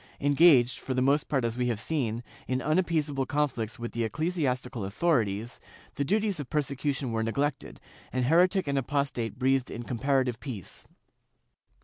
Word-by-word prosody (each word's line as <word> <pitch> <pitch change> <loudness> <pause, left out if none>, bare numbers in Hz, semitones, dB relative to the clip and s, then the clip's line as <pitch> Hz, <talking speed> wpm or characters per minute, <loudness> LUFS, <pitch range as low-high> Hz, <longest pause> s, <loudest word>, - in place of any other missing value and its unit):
Engaged, 140 -4 +5
for 130 - -3
the 130 - +1
most 140 +3 +2
part 135 -5 +1
as 115 0 -1
we 125 0 0
have 115 -4 -1
seen, 120 -5 -2 0.2
in 130 0 0
unappeaseable 155 -3 0
conflicts 135 -7 -1
with 120 -1 -5
the 120 - -2
ecclesiastical 130 - -1
authorities, 110 - 0 0.3
the 140 - -1
duties 205 +2 0
of 145 - -6
persecution 140 -3 -1
were 115 0 0
neglected, 140 +5 -2 0.3
and 130 -1 0
heretic 180 +5 +3
and 140 -1 +1
apostate 135 -4 -2
breathed 130 0 +1
in 120 - -6
comparative 130 0 0
peace. 115 - -8
135 Hz, 150 wpm, -28 LUFS, 120-150 Hz, 0.3 s, Engaged